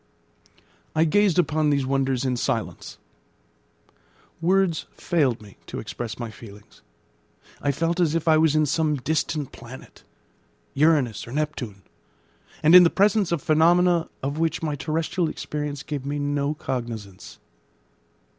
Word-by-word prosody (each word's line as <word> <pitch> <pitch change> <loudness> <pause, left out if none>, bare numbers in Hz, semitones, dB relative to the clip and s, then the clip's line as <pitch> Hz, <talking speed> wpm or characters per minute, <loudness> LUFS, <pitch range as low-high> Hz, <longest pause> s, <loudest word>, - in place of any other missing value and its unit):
I 160 - +4
gazed 190 +2 +3
upon 155 -3 +2
these 140 -2 +1
wonders 135 -1 0
in 130 -1 0
silence. 120 -2 -3 1.4
Words 185 -1 +1
failed 135 -10 0
me 100 -2 -15
to - - -6
express 115 -2 -6
my 120 -2 -5
feelings. 105 0 -14 0.8
I 145 - +1
felt 165 +5 -1
as 165 -3 +2
if 165 0 -2
I 160 - +6
was 155 -1 +3
in 155 0 +3
some 155 +1 +1
distant 150 +1 -2
planet 120 +2 -12 0.7
Uranus 140 -8 +2
or - - -9
Neptune 130 -10 -4 0.8
and 155 +2 +5
in 180 - +11
the 170 - +5
presence 200 -1 +2
of 170 -4 -1
phenomena 170 +2 +3
of 140 +3 -2
which 165 0 -1
my 155 -2 -1
terrestrial 160 +4 -1
experience 150 -2 -5
gave 145 -3 -5
me 145 +1 -3
no 145 +1 -1
cognisance. 115 -9 -6
150 Hz, 135 wpm, -24 LUFS, 130-165 Hz, 1.4 s, in